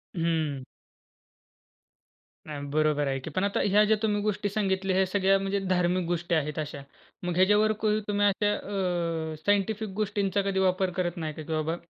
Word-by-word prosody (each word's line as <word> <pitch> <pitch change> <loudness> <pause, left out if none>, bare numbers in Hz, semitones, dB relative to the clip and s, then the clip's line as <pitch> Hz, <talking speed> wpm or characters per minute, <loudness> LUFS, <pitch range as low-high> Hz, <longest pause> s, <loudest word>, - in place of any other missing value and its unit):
हं. 160 -5 -1 1.8
नाही 145 -2 -6
बरोबर 150 -1 +2
आहे 135 0 -1
की. 130 - -7
पण 185 +5 -1
आता 200 0 0
ह्या 205 +1 +4
ज्या 220 +1 +4
तुम्ही 210 -2 +1
गोष्टी 205 0 -1
सांगितल्या, 195 -2 0
ह्या 190 0 +3
सगळ्या 195 0 +3
म्हणजे 195 +1 -1
धार्मिक 180 0 +1
गोष्टी 175 0 -1
आहेत 150 -1 -1
अशा. 150 -2 -5 0.4
मग 175 -1 -2
ह्याच्यावर 210 +4 +4 0.4
तुम्ही 205 0 +1
अशा 205 +1 +2
अ, 170 -6 -2
सायंटिफिक 205 +1 +1
गोष्टींचा 200 -1 0
कधी 195 -1 0
वापर 185 0 +2
करत 175 -1 -1
नाही 160 -2 -3
का? 155 - -8
की 160 +1 -5
बाबा 155 +1 -1
185 Hz, 165 wpm, -27 LUFS, 160-200 Hz, 1.8 s, ह्या